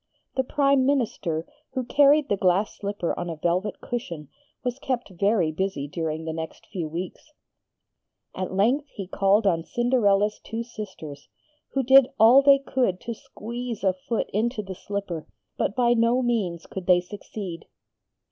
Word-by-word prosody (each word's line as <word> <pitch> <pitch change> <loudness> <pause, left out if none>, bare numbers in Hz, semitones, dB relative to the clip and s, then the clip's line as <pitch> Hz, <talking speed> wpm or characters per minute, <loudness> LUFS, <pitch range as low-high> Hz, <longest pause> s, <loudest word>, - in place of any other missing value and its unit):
The 265 - +2
Prime 275 0 +3
Minister, 205 - 0 0.3
who 260 - -1
carried 285 +3 +4
the 205 - +1
glass 190 +2 +1
slipper 200 -4 -2
on 175 - -3
a 165 - -4
velvet 175 +6 -1
cushion, 170 - -5 0.3
was 250 +1 -2
kept 250 -6 -3
very 185 -2 +2
busy 155 -4 -2
during 160 +1 -3
the 160 - -3
next 160 0 -7
few 180 -7 -4
weeks. 180 - -6 1.0
At 185 - -4
length 235 +10 +2
he 200 -8 -7
called 195 +3 +2
on 165 -4 +2
Cinderella's 210 -3 +2
two 225 +1 -4
sisters, 190 -11 -9 0.4
who 270 - +1
did 265 +1 +7
all 235 +5 +8
they 280 0 +7
could 255 -8 0
to 235 - -4
squeeze 235 +1 -7
a 190 -1 +3
foot 200 +5 -3
into 220 +2 0
the 190 -1 -6
slipper, 190 -4 -5 0.3
but 200 - -1
by 240 -1 +4
no 235 +2 +2
means 200 -9 -1
could 190 -2 -7
they 180 -1 +6
succeed. 185 -2 -8
205 Hz, 155 wpm, -25 LUFS, 180-245 Hz, 1.0 s, all